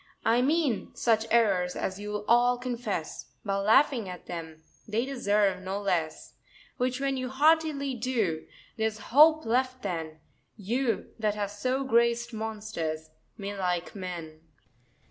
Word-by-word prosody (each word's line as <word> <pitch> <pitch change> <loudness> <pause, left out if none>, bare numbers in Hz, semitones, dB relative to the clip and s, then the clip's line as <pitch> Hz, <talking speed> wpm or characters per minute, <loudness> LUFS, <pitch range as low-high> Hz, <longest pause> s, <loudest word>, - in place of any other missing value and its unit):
I 230 +2 +4
mean 285 -4 0
such 225 -1 +2
errors 195 -6 +3
as 190 +1 -3
you'll 210 0 -4
all 245 +1 +4
confess, 235 -9 -4 0.2
By 195 -1 0
laughing 225 +1 +3
at 180 -1 -9
them, 160 -2 -7 0.2
they 225 +3 0
deserve 205 -8 +1
no 190 +2 -3
less: 170 -6 -2 0.4
Which 255 0 0
when 275 -1 0
you 255 -1 -3
heartily 295 0 +2
do, 225 -10 -1 0.3
there's 220 -1 0 0.2
hope 310 +2 +7
left 255 +2 0
then, 160 -5 -4 0.4
You, 230 +4 -1
that 210 -2 +1
have 205 -1 -2
so 255 +6 -1
grac'd 235 -1 +2
monsters, 210 -8 -4 0.3
may 205 0 -5
like 180 -3 -2
men. 170 -5 -7
220 Hz, 135 wpm, -28 LUFS, 190-255 Hz, 0.4 s, hope